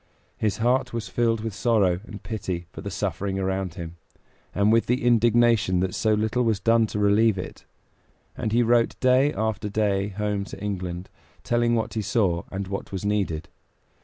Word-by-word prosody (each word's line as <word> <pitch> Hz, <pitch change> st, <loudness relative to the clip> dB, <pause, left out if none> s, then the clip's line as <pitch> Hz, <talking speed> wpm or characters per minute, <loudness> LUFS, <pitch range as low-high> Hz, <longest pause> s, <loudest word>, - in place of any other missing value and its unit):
His 105 Hz, -2 st, -1 dB
heart 125 Hz, +3 st, +1 dB
was 115 Hz, -2 st, -3 dB
filled 115 Hz, -2 st, +1 dB
with 110 Hz, -1 st, -4 dB
sorrow 100 Hz, -6 st, +2 dB
and 105 Hz, -3 st, -10 dB
pity 90 Hz, -6 st, -4 dB
for -, -, -9 dB
the -, -, -5 dB
suffering 95 Hz, -1 st, -2 dB
around 95 Hz, -2 st, -2 dB
him, 85 Hz, -2 st, -7 dB, 0.5 s
and 100 Hz, +2 st, +2 dB
with 115 Hz, 0 st, +2 dB
indignation 120 Hz, -5 st, +3 dB
that 95 Hz, -1 st, -1 dB
so 110 Hz, -1 st, +2 dB
little 110 Hz, +3 st, 0 dB
was 110 Hz, -4 st, +1 dB
done 115 Hz, 0 st, +3 dB
to 105 Hz, -, -5 dB
relieve 105 Hz, +1 st, +3 dB
it; 90 Hz, -, -7 dB, 0.7 s
and 110 Hz, -, -3 dB
he 120 Hz, +2 st, +3 dB
wrote 120 Hz, 0 st, +2 dB
day 130 Hz, +3 st, +4 dB
after 110 Hz, -3 st, -2 dB
day 100 Hz, -2 st, 0 dB
home 105 Hz, 0 st, -2 dB
to 100 Hz, -, -9 dB
England, 90 Hz, -3 st, -4 dB, 0.4 s
telling 120 Hz, 0 st, +2 dB
what 115 Hz, -, -2 dB
he 110 Hz, -, -1 dB
saw 100 Hz, -5 st, 0 dB
and 95 Hz, +1 st, -4 dB
what 100 Hz, +1 st, -5 dB
was 95 Hz, 0 st, -4 dB
needed. 100 Hz, -7 st, -1 dB
105 Hz, 175 wpm, -25 LUFS, 95-115 Hz, 0.7 s, day